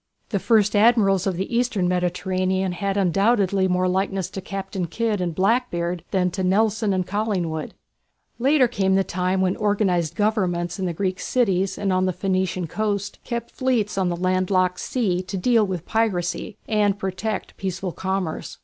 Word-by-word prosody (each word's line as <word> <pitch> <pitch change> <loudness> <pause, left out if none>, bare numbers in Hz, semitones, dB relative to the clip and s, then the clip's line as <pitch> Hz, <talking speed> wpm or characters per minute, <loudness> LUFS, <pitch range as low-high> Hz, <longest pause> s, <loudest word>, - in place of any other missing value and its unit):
The 200 - 0
first 210 -1 +3
Admirals 205 -4 +4
of 190 - 0
the 190 +5 -3
Eastern 230 -7 +1
Mediterranean 185 +1 0
had 195 +2 -2
undoubtedly 195 0 +2
more 180 0 +1
likeness 190 0 -1
to 195 - -5
Captain 195 -1 -4
Kidd 215 +2 -1
and 170 -3 -2
"Blackbeard" 185 -5 0
than 180 -2 +1
to 190 +2 -3
Nelson 215 +3 +2
and 185 -1 0
Collingwood. 185 -6 -2 0.6
Later 270 +1 +4
came 195 -5 +1
the 195 - +3
time 185 +1 -1
when 185 0 +1
organized 190 -6 +1
Governments 185 -5 0
in 185 - -1
the - - -1
Greek 185 +2 -2
cities 195 -6 +1
and 200 -2 0
on 185 0 +2
the 185 - 0
Phoenician 185 -1 -1
coast 205 +3 -2
kept 235 -1 -4
fleets 245 -5 0
on 190 -2 +1
the 175 - -1
land 185 +1 0
locked 185 -2 +2
sea 195 -8 0
to 185 +1 -5
deal 225 +2 +3
with 180 -3 -4
piracy 205 -3 -1
and 205 -2 +2
protect 195 +2 -3
peaceful 190 -1 -3
commerce. 190 -2 -3
190 Hz, 165 wpm, -23 LUFS, 180-210 Hz, 0.6 s, Admirals